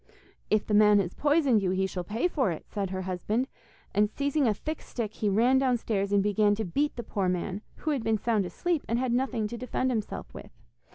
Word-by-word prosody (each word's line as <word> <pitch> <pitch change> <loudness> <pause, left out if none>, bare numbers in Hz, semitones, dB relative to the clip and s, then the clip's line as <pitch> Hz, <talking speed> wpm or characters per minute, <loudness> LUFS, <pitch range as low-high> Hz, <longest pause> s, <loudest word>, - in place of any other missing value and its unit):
'If 215 -1 +2
the 210 - -2
man 210 0 +6
has 185 -3 0
poisoned 290 -7 +3
you 190 - 0
he 190 +1 +1
shall 185 -1 -4
pay 220 - 0
for 275 - 0
it,' 165 - -5
said 200 -3 -3
her 185 0 -3
husband, 205 +7 -1 0.5
and 210 0 +3
seizing 285 +3 0
a 215 - +3
thick 310 +6 -5
stick 220 -4 -5
he 210 - -1
ran 240 +6 +4
downstairs 230 -6 0
and 200 -1 +3
began 205 0 +3
to 220 +1 -3
beat 285 - 0
the 240 - -5
poor 195 -3 -1
man, 185 +2 -2
who 310 - -2
had 270 -6 -1
been 220 0 +2
sound 210 -3 0
asleep, 345 - -1
and 230 - 0
had 250 -1 0
nothing 245 -4 0
to 235 +2 -7
defend 255 +1 -1
himself 220 -4 -4
with. - - -10
215 Hz, 225 wpm, -28 LUFS, 200-255 Hz, 0.5 s, man